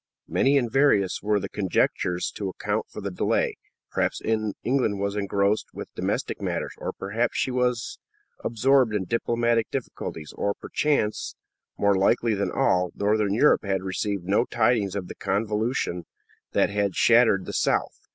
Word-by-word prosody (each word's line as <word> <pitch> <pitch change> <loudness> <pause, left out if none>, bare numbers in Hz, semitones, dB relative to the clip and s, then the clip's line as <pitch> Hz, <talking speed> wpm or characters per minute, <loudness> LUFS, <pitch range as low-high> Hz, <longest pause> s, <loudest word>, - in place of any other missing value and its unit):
Many 140 +2 +3
and 120 -4 0
various 125 -9 +3
were 105 0 +1
the - - -4
conjectures 90 -2 0
to 100 -2 -4
account 105 +3 -2
for - - -8
the 100 0 -4
delay. 90 - 0 0.3
Perhaps - - 0
England 110 +1 0
was 100 0 -1
engrossed 100 +1 0
with - - -8
domestic - - -2
matters, - - -2
or - - -3
perhaps 110 +5 -2
she 130 - 0
was 125 -2 -1 0.4
absorbed 120 0 +3
in 100 - 0
diplomatic 115 +1 +1
difficulties; 80 - -5
or 100 0 -1
perchance, 140 -8 -1 0.4
more 100 0 +3
likely 110 +4 +2
than 100 -2 -1
all, 90 -1 +2
Northern 105 0 +1
Europe 145 +6 +4
had 95 -2 -1
received 95 0 -2
no 100 +6 +2
tidings 110 -4 +1
of 95 -3 -3
the - - -7
convulsion 105 -2 -1 0.5
that - - +2
had 100 -2 0
shattered 115 -5 +4
the - - -6
south. - - 0
105 Hz, 150 wpm, -25 LUFS, 100-120 Hz, 0.5 s, Europe